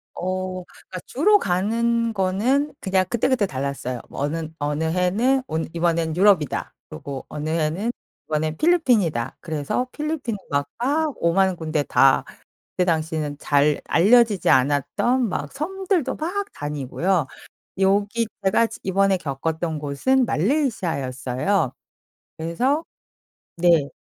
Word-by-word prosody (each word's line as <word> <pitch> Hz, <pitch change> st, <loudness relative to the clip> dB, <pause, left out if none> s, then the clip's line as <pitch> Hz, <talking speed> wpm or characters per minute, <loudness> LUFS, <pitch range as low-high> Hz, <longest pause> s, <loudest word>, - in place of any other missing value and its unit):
어 185 Hz, 0 st, -3 dB
그니까 185 Hz, 0 st, -11 dB
주로 410 Hz, -, +4 dB
가는 230 Hz, -, 0 dB
거는 220 Hz, +10 st, +1 dB
그냥 190 Hz, -1 st, +1 dB
그때그때 240 Hz, -1 st, +1 dB
달랐어요. 135 Hz, -4 st, -4 dB
뭐 -, -, -8 dB
어는 160 Hz, +2 st, -3 dB
어느 150 Hz, +2 st, -1 dB
해는 195 Hz, +11 st, +1 dB
온 160 Hz, -7 st, -2 dB
'이번엔 165 Hz, -1 st, 0 dB
유럽이다.' 185 Hz, -7 st, +2 dB, 0.2 s
그리고 135 Hz, -, -7 dB
어느 150 Hz, +1 st, -5 dB
해는 165 Hz, +8 st, 0 dB, 0.4 s
'이번엔 155 Hz, 0 st, -1 dB
필리핀이다.' 225 Hz, -, +2 dB
그래서 155 Hz, -, -2 dB
필리핀 300 Hz, -7 st, -3 dB
막 140 Hz, -1 st, 0 dB, 0.2 s
막 300 Hz, +2 st, +1 dB
오만 185 Hz, +2 st, +2 dB
군데 155 Hz, -2 st, -1 dB
다 135 Hz, 0 st, +4 dB, 0.5 s
그때 180 Hz, -, 0 dB
당시에는 160 Hz, -3 st, -1 dB
잘 145 Hz, 0 st, +2 dB
알려지지 210 Hz, +4 st, +4 dB
않았던 145 Hz, -, +2 dB
막 -, -, -4 dB
섬들도 350 Hz, -1 st, -1 dB
막 380 Hz, +6 st, -2 dB
다니고요. 150 Hz, +3 st, -1 dB, 0.5 s
여기 205 Hz, +4 st, +2 dB, 0.2 s
제가 205 Hz, +4 st, +3 dB
지 -, -, -10 dB
이번에 195 Hz, +1 st, +2 dB
겪었던 160 Hz, +2 st, -3 dB
곳은 150 Hz, -, +1 dB
말레이시아였어요. 165 Hz, -, 0 dB, 0.7 s
그래서 250 Hz, -, 0 dB, 0.7 s
네. 165 Hz, -5 st, +3 dB
180 Hz, 275 characters per minute, -23 LUFS, 155-235 Hz, 0.7 s, 주로